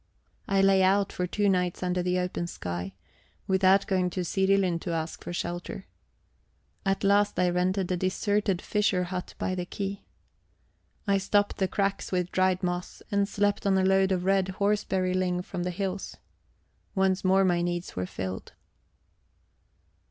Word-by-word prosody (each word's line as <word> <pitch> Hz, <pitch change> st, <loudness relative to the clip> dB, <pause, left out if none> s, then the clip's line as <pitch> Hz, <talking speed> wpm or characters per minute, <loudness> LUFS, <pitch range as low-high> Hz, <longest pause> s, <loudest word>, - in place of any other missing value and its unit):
I 195 Hz, 0 st, +3 dB
lay 195 Hz, -1 st, +5 dB
out 195 Hz, +1 st, +3 dB
for 180 Hz, -1 st, -2 dB
two 205 Hz, +3 st, 0 dB
nights 180 Hz, -2 st, +1 dB
under 180 Hz, 0 st, 0 dB
the 180 Hz, 0 st, 0 dB
open 180 Hz, -1 st, -2 dB
sky, 90 Hz, -, -5 dB, 0.5 s
without 190 Hz, +1 st, +4 dB
going 185 Hz, -2 st, +1 dB
to 180 Hz, +1 st, -3 dB
Sirilund 190 Hz, -2 st, +2 dB
to 170 Hz, -, -3 dB
ask 160 Hz, 0 st, -4 dB
for -, -, -5 dB
shelter. 175 Hz, +2 st, -4 dB, 1.0 s
At 195 Hz, 0 st, 0 dB
last 205 Hz, +1 st, +3 dB
I 180 Hz, -1 st, +3 dB
rented 185 Hz, +1 st, 0 dB
a 180 Hz, -, +1 dB
deserted 195 Hz, +1 st, 0 dB
fisher 205 Hz, -3 st, +1 dB
hut 180 Hz, 0 st, -5 dB
by 185 Hz, -, -1 dB
the 180 Hz, -1 st, -3 dB
quay. 200 Hz, 0 st, -4 dB, 1.0 s
I 200 Hz, -1 st, +2 dB
stopped 205 Hz, +1 st, +1 dB
the 190 Hz, -, +1 dB
cracks 195 Hz, +1 st, -1 dB
with 180 Hz, -1 st, -1 dB
dried 185 Hz, 0 st, +2 dB
moss, 175 Hz, 0 st, -3 dB
and 200 Hz, 0 st, +1 dB
slept 205 Hz, 0 st, 0 dB
on 190 Hz, -1 st, +3 dB
a 190 Hz, -, +2 dB
load 190 Hz, 0 st, +3 dB
of 180 Hz, -1 st, 0 dB
red 195 Hz, -1 st, +3 dB
horseberry 200 Hz, -3 st, +1 dB
ling 180 Hz, -1 st, 0 dB
from 180 Hz, -, -5 dB
the 180 Hz, -, -1 dB
hills. 190 Hz, +1 st, -4 dB, 0.8 s
Once 190 Hz, -1 st, +2 dB
more 190 Hz, +1 st, +4 dB
my 175 Hz, -2 st, +2 dB
needs 175 Hz, 0 st, -3 dB
were 90 Hz, 0 st, -2 dB
filled. 95 Hz, +1 st, -6 dB
185 Hz, 160 wpm, -28 LUFS, 180-195 Hz, 1.0 s, lay